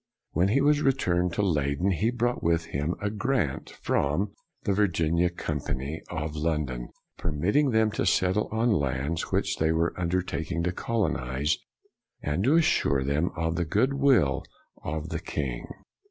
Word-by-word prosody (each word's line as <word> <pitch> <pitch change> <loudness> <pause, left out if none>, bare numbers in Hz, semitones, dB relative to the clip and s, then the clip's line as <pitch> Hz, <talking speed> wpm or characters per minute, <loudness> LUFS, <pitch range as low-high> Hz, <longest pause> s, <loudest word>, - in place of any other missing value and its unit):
When 90 +4 +2
he 125 +8 +3
re 145 -1 +4
turned 90 -8 0
to 105 - 0
Leyden, 75 0 +1
he 105 +5 +1
brought 120 0 0
with 85 0 +1
him 75 +2 -2
a 105 0 -1
grant 110 - -1
from 90 +9 -1 0.3
the 100 - +1
Virginia 85 -3 +2
Company 75 -3 -4
of 80 -2 -3
Lon 75 0 0
don, 60 -2 -6 0.3
permitting 90 - +1
them 110 -2 +3
to 105 - -1
settle 95 +3 +2
on 115 +2 +2
lands 70 -1 -1
which - - 0
they 80 0 +2
were 85 +1 +1
undertaking 85 -1 -1
to 90 - +1
colonize, 75 - 0 0.6
and 80 - -1
assuring 140 - +3
them 75 +6 +1
of 80 -1 -1
the 85 - +1
good 110 - +1
will 135 - +3 0.4
of 80 +2 -3
the - - -2
king. 65 -4 -4
85 Hz, 155 wpm, -27 LUFS, 75-105 Hz, 0.6 s, re